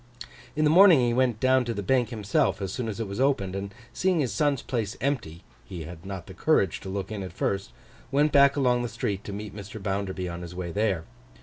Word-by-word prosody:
In 155 - +1
the 150 - +4
morning, 180 -3 +8
he 120 -1 +2
went 125 -3 +1
down 130 +1 +4
to 115 -1 -3
the 100 - -3
Bank 125 +2 +2
himself 105 -3 0
as 95 -1 -4
soon 125 -3 -3
as 110 0 -4
it 115 - -2
was 100 +4 -5
opened, 130 -9 +1
and 100 0 -4 0.2
seeing 185 -2 +1
his 130 -5 0
son's 145 -4 +1
place 115 -4 -3
empty 120 - -2 0.2
(he 90 -4 -7
had 85 +3 -10
not 95 -3 -6
the - - -11
courage - - +2
to - - -8
look 95 +1 -4
in 105 -2 -4
at 95 - -6
first) 100 0 -2 0.4
went 145 +2 +3
back 140 0 +6
along 125 -3 +2
the 120 - -3
street 105 -3 -3
to - - -5
meet 105 +1 -6
Mr. 105 +1 -8
Bounderby 95 -2 -2
on 85 0 -6
his 85 0 -8
way 90 -1 -4
there. 100 -4 0
105 Hz, 235 wpm, -27 LUFS, 95-130 Hz, 0.4 s, morning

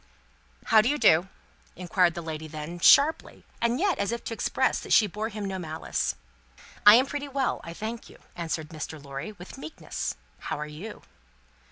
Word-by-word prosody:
"How 220 - +6
do 230 - +1
you 295 - +1
do?" 175 - +5 0.5
inquired 180 -1 +2
that 170 - -5
lady 160 -1 -5
then 155 +3 -7
sharply, 285 - +4 0.2
and 235 +2 +1
yet 385 -4 +1
as 200 - 0
if 235 - -4
to - - -4
express - - 0
that - - -9
she 220 - +7
bore 210 +3 -4
him 210 -2 -5
no 190 -1 -3
malice. 160 -2 -2 0.7
"I 210 - +12
am 255 +3 +5
pretty 290 +1 -4
well, 275 -1 -1
I 170 0 -8
thank 220 +4 -6
you," - - -15 0.2
answered 160 -2 -3
Mr. 155 0 -6
Lorry, 140 +8 -7
with 190 +7 -11
meekness; 315 - -5 0.2
"how - - -4
are 150 - -3
you?" 160 +9 -9
195 Hz, 185 wpm, -27 LUFS, 160-235 Hz, 0.7 s, I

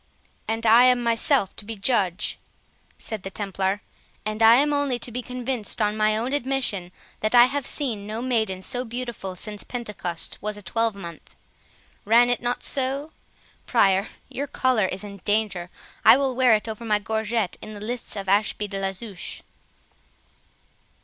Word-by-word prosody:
"And 225 +1 -2
I 230 +3 +7
am 250 -1 +4
myself 230 -2 +2
to - - -1
be 225 +2 -6
judge," 195 -4 +1 0.6
said 220 -3 -5
the 195 - -5
Templar, 195 0 -2 0.4
"and 215 +1 -3
am 250 +7 +6
only 285 -3 +1
to 240 - -5
be 250 +2 -3
convicted 250 -2 -4
on 210 -1 +1
my 215 0 +2
own 240 +5 -2
admission, 250 -10 -1 0.3
that 215 +3 +1
I 240 0 +9
have 275 +1 -2
seen 225 -9 -1
no 215 +1 -4
maiden 220 -7 -1
so 250 +5 -2
beautiful 235 -6 -5
since 210 +2 -6
Pentecost 210 -8 -5
was 210 +1 -3
a 205 - -10
twelvemonth. 200 -6 -3 0.7
Ran 235 +3 +5
it 245 - 0
not 245 +1 -2
so?—Prior, 260 -7 -1 0.2
your 285 +2 -4
collar 255 -7 +2
is 190 +2 -3
in 200 -1 -8
danger; 205 -3 0 0.3
I - - +9
will 270 -2 0
wear 250 -3 +5
it 215 - -2
over 220 +1 -6
my 215 -2 +2
gorget 220 -1 -2
in 215 - -8
the - - -8
lists 230 +3 -4
of 195 -1 -5
Ashby 210 +1 +1
de 195 -1 -5
la 195 0 -1
Zouche." 200 -2 -7
220 Hz, 165 wpm, -24 LUFS, 205-245 Hz, 0.7 s, I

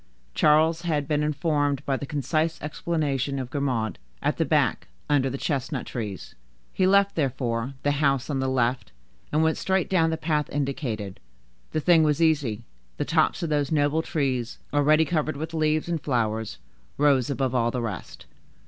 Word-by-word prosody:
Charles 160 +2 +4
had 155 -4 -1
been 150 -1 +1
informed 145 -2 0
by 135 - +1
the 140 - -5
concise 155 +3 -1
explanation 145 -3 -2
of 130 -2 -5
Grimaud,—"At 110 - -2
the - - +1
back, - - +1 0.2
under 140 -3 +2
the 135 - -4
chestnut 135 -3 -2
trees;" 105 -7 -6 0.4
he 185 - +2
left, 200 +1 +4
therefore, 130 -3 -2
the 145 - +2
house 140 -2 +1
on 140 -3 -1
the 130 - 0
left, 125 - 0 0.4
and 155 +2 +2
went 160 0 +2
straight 190 -1 0
down 165 -3 +3
the 160 - -1
path 150 -2 -1
indicated. 130 -8 -3 0.5
The 155 - -1
thing 170 +1 +5
was 150 -1 +2
easy; 145 -9 +1 0.3
the 145 - -1
tops 160 +3 +1
of 165 - -2
those 145 -1 0
noble 150 +1 +2
trees, 130 -7 -2 0.2
already 155 +2 +4
covered 155 -3 -1
with 160 +2 -5
leaves 155 0 +1
and 170 -3 -2
flowers, 110 -6 -1 0.4
rose 140 -3 +3
above 135 -2 -1
all 120 -2 +2
the 125 - -2
rest. 105 -6 -6
145 Hz, 165 wpm, -25 LUFS, 130-155 Hz, 0.5 s, thing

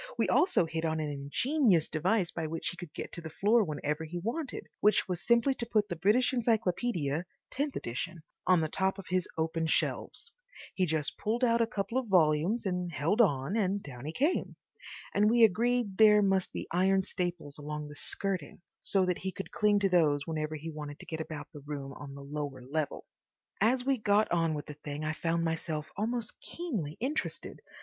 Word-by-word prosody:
We - - +2
also 365 - +4
hit 165 0 -3
on 160 -1 0
an 150 -1 -2
ingenious 175 - +2
device 175 +3 +1
by 160 -2 -3
which 165 +1 -3
he - - -6
could 175 -4 -9
get - - -6
to 170 - -7
the 160 - -6
floor 215 +8 +3
whenever 150 -1 -2
he 165 +2 -5
wanted, 245 - -3
which 210 +1 +3
was 180 -2 -3
simply 235 +4 +3
to 240 - -4
put 215 -2 +1
the 175 - -2
British 215 - +3
Encyclopaedia 200 - 0 0.2
(tenth 285 +1 -1
edition) 155 +8 -4 0.2
on 185 -2 +5
the 160 - +1
top 190 +4 0
of 195 - -8
his 185 -1 +1
open 160 0 0
shelves. 465 - -1 0.4
He 185 -1 +1
just 155 -2 -1
pulled 230 +4 -1
out 235 -1 +4
a 230 - +3
couple 210 +4 -1
of 255 - -5
volumes 180 +4 +3
and 180 -2 -1
held 170 +10 +2
on, 145 - +2
and 200 -2 +1
down 130 -2 -9
he 155 - -3
came. 290 - 0 0.6
And 210 +1 +4
we 235 0 +5
agreed 225 0 +2
there 210 -1 +7
must 195 -2 +2
be - - -5
iron 190 +2 +3
staples 175 -6 -3
along 150 0 -5
the 145 - -10
skirting, 185 -2 -2 0.2
so 195 -2 +2
that 180 -1 0
he 190 - -3
could 195 - -7
cling 210 -1 +3
to 195 - +3
those 150 -6 +3
whenever 155 -1 -2
he 160 +2 -6
wanted 150 -1 -7
to - - -11
get 160 -1 -4
about 155 -2 -6
the 145 - -9
room 140 -2 -5
on 140 -1 -9
the 140 - -9
lower 140 -2 -5
level. 145 +3 -3 0.6
As 245 +4 +3
we 270 -2 +2
got 210 0 +3
on 165 -2 +2
with 145 - -5
the 150 - -7
thing 145 0 -6
I 155 - 0
found 165 +1 0
myself 160 -2 -2
almost 225 +2 -3
keenly 215 - -4
interested. 275 +6 -3
180 Hz, 200 wpm, -31 LUFS, 155-215 Hz, 0.6 s, there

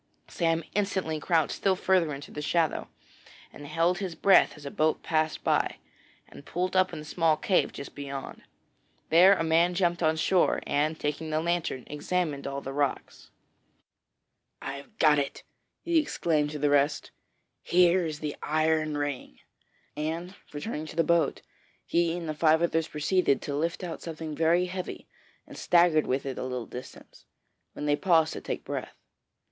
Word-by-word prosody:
Sam 165 -1 0
instantly 190 -6 -1
crouched 160 -1 +1
still 195 -1 +1
farther 185 -4 +2
into 140 0 -8
the 150 - -6
shadow, 165 +1 0 0.7
and 145 - -10
held 165 +4 +1
his 185 -4 -4
breath 195 -5 +4
as 145 - -13
a 140 - -5
boat 155 0 0
passed 155 -1 0
by, - - +1 0.5
and - - -13
pulled 180 +5 -3
up 185 0 +3
in 165 - -6
a 150 - -7
small 160 -1 +2
cave 200 -7 +1
just 140 - -9
beyond. 140 -1 -7 0.7
Then 185 +4 +7
a - - -1
man 165 +2 +3
jumped 175 -1 +1
on 160 -1 +3
shore, 180 +3 +2
and, 155 +2 0
taking 150 +2 -3
the 155 0 0
lantern, 170 -6 -1
examined 150 -1 -2
all 140 0 -4
the 135 - -6
rocks. 140 -1 -3 1.3
'I've 140 +11 -8
got 150 -2 +5
it!' 140 - -4 0.4
he 340 -1 +3
exclaimed 155 - 0
to 150 - -5
the 145 0 +1
rest. 145 +1 +1 0.5
'Here 180 +1 +4
is 155 -2 -4
the 150 -1 -3
iron 155 0 +1
ring,' 145 - -4 0.6
and, 165 +4 -4 0.2
returning 150 0 -5
to - - -9
the 165 - +3
boat, 170 -1 +1 0.4
he 170 0 +1
and 170 -2 -6
the 155 - -2
five 160 +2 +3
others 165 -1 +1
proceeded 150 -1 +1
to 140 - -3
lift 165 +4 -2
out 175 -2 -5
something 160 -2 -6
very 165 +3 +3
heavy, 185 0 -6 0.4
and - - -12
staggered 170 -3 +4
with 130 +2 -1
it 135 -2 -4
a - - -3
little 125 -2 -4
distance, 125 - -11 0.5
when - - -5
they 145 0 +3
paused 165 -2 +3
to - - -6
take - - -4
breath. - - -5
160 Hz, 170 wpm, -28 LUFS, 150-175 Hz, 1.3 s, Then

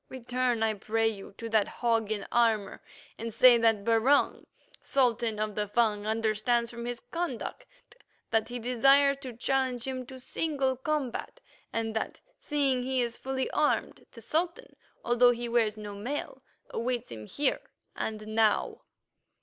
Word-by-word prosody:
Return, 250 -2 -1
I 220 -1 +2
pray 225 +2 0
you, 200 -2 -5
to 230 - -5
that 215 -2 +3
hog 225 -3 0
in 210 -2 -2
armour, 225 -4 +1 0.4
and 230 +1 -4
say 240 +2 +7
that 225 -3 +3
Barung, 230 +5 +3 0.3
Sultan 235 -4 +1
of 215 0 -1
the 210 0 -2
Fung, 210 -1 +1
understands 225 +2 +1
from 235 0 -7
his 245 0 -4
conduct 335 -8 -4 0.6
that 225 0 +1
he 245 - -4
desires 270 +4 +4
to 255 -5 -7
challenge 260 -1 0
him 255 -1 -4
to 260 -1 -10
single 270 -1 -1
combat, 285 - -3 0.3
and 225 -1 -2
that, 220 - -3 0.2
seeing 275 -4 +1
he 260 +1 -1
is 235 -1 -1
fully 265 0 -2
armed, 300 0 0
the 230 - -13
Sultan, 345 - -2 0.3
although 240 +1 +5
he 240 0 -1
wears 225 -3 +1
no 210 -1 -7
mail, 245 +9 -5 0.3
awaits 245 0 -2
him 110 -2 -8
here 285 -2 0 0.3
and 215 -1 -4
now." 215 0 +1
235 Hz, 150 wpm, -29 LUFS, 220-260 Hz, 0.6 s, say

